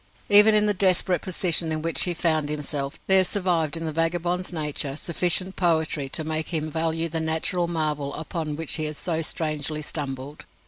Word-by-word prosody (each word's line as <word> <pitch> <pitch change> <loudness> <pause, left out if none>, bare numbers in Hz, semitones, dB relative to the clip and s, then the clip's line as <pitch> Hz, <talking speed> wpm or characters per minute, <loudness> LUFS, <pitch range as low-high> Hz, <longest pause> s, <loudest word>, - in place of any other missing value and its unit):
Even 210 +1 +8
in 210 0 +4
the 210 - +2
desperate 185 -2 +2
position 170 -3 0
in 155 0 -3
which 165 -4 +3
he 175 -1 -2
found 155 -3 0
himself, 145 -1 -4
there 190 -1 +5
survived 175 -5 -1
in 165 - -4
the 160 - -2
vagabond's 175 +3 -1
nature 150 -4 -2
sufficient 180 +3 +1
poetry 160 -5 +1
to 160 - -1
make 155 0 -2
him 155 -2 -2
value 165 +1 -1
the 165 0 -3
natural 160 +2 0
marvel 150 -4 -2
upon 160 -1 -4
which 160 +1 -2
he 155 - 0
had 150 -1 -4
so 165 -2 -2
strangely 155 -1 -3
stumbled. 140 -1 -5
160 Hz, 180 wpm, -24 LUFS, 150-175 Hz, -, Even